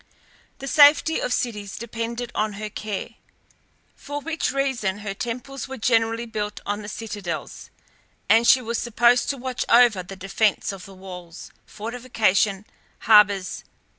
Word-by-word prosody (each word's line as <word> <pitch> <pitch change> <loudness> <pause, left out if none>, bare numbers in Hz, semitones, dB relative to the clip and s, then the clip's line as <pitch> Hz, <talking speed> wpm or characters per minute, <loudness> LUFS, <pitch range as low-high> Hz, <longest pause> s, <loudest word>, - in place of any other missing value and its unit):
The 275 - -8
safety 295 +3 +5
of - - -2
cities 210 -5 -2
depended 235 +1 -5
on 215 0 -1
her 210 +1 -6
care, 210 -1 -5 0.9
for 290 +1 -6
which 320 -1 -2
reason 260 -8 -1
her 195 - -3
temples 250 +5 -5
were 265 - -7
generally 230 0 +1
built 210 -2 -4
on 205 +1 -2
the 205 - -7
citadels, 205 -6 -6 0.6
and 230 +1 +5
she 260 - +6
was 230 0 -2
supposed 240 +1 +3
to 280 - -1
watch 255 0 -3
over 235 -5 +5
the 190 +2 -10
defence 195 +3 0
of 195 -3 -9
the 195 - -13
walls, 180 -3 -10 0.2
fortifications, 215 -4 0 0.4
harbours, 200 -4 +4
&c. - - -34
225 Hz, 145 wpm, -23 LUFS, 205-245 Hz, 0.9 s, she